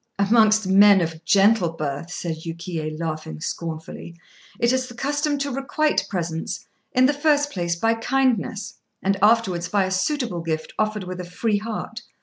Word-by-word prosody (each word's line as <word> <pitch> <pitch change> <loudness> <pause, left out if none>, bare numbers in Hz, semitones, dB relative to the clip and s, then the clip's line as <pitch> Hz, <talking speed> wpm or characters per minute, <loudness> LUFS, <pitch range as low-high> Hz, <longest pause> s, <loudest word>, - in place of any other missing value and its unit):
"Amongst 215 +1 +4
men 200 +1 +7
of 165 -1 -3
gentle 195 -3 +4
birth," 150 +1 -4
said 170 -2 -4
Yukiyé, 165 -1 -5
laughing 155 - -4
scornfully, 165 - -6 0.4
"it 235 +1 +3
is 260 0 0
the 240 - -11
custom 290 +4 -1
to 280 0 -2
requite 295 +4 0
presents, 170 -4 -3 0.3
in 255 0 +4
the 285 - +3
first 290 0 +2
place 170 -2 -1
by 225 +6 +2
kindness, 230 -4 -1 0.2
and 195 +1 +2
afterwards 200 -5 +3
by 200 -2 +2
a 190 - -4
suitable 205 - -1
gift 160 -1 -3
offered 215 -1 0
with 180 0 -6
a - - -6
free 205 +5 -1
heart. 225 +1 -5
200 Hz, 160 wpm, -23 LUFS, 170-235 Hz, 0.4 s, men